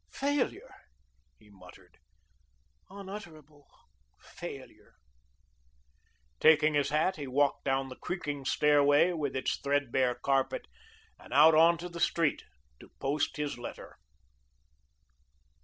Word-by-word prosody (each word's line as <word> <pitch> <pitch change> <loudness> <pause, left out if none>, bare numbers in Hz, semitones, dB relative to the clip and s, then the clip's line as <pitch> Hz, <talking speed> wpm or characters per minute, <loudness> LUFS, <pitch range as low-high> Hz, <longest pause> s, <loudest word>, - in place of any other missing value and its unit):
"Failure," 285 - -2 0.6
he 105 -1 -22
muttered, 100 - -17 0.9
"unutterable 175 -7 -11 0.5
failure." - - -11 1.4
Taking 155 0 +5
his 145 -1 +1
hat, 155 +5 0
he 145 -2 -6
walked 140 +2 0
down 135 0 0
the 130 - -9
creaking 145 -6 -5
stairway, 145 +3 +3
with 150 -6 -3
its 130 - -1
threadbare 135 -3 0
carpet, 135 +1 -1 0.5
and - - -16
out 150 +5 +6
onto 170 +2 +4
the 170 -1 -9
street 165 -3 +1 0.4
to - - -15
post 145 +3 -1
his 145 -4 -4
letter. 120 - -10
145 Hz, 105 wpm, -30 LUFS, 135-165 Hz, 1.4 s, out